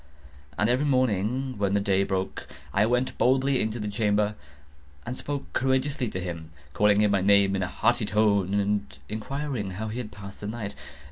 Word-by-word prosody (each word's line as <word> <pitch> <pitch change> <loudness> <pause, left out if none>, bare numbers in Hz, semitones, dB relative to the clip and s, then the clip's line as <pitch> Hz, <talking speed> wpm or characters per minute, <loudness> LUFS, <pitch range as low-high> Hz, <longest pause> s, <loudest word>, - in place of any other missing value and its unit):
And 105 - +2
every 130 +5 +2
morning, 130 -1 +1
when 100 -1 +1
the - - +4
day 100 -1 +2
broke, 95 -1 -3 0.3
I 105 - +3
went 125 +2 0
boldly 130 +1 +3
into 110 +2 -1
the 105 - -3
chamber, 105 0 +1 0.7
and 125 - -4
spoke 145 +1 -5
courageously 130 -1 +1
to 95 - -4
him, 85 -3 -5 0.2
calling 105 0 +4
him 105 -1 +3
by 100 -2 +2
name 100 0 +4
in 95 - -1
a 95 - 0
hearty 115 +2 +1
tone, 100 -2 +2
and 100 -9 -1
inquiring 125 0 -3
how 110 +1 -3
he 115 +3 -4
has 120 - -4
passed 100 -1 -10
the 105 - -5
night. 110 -2 -4
105 Hz, 185 wpm, -27 LUFS, 100-125 Hz, 0.7 s, the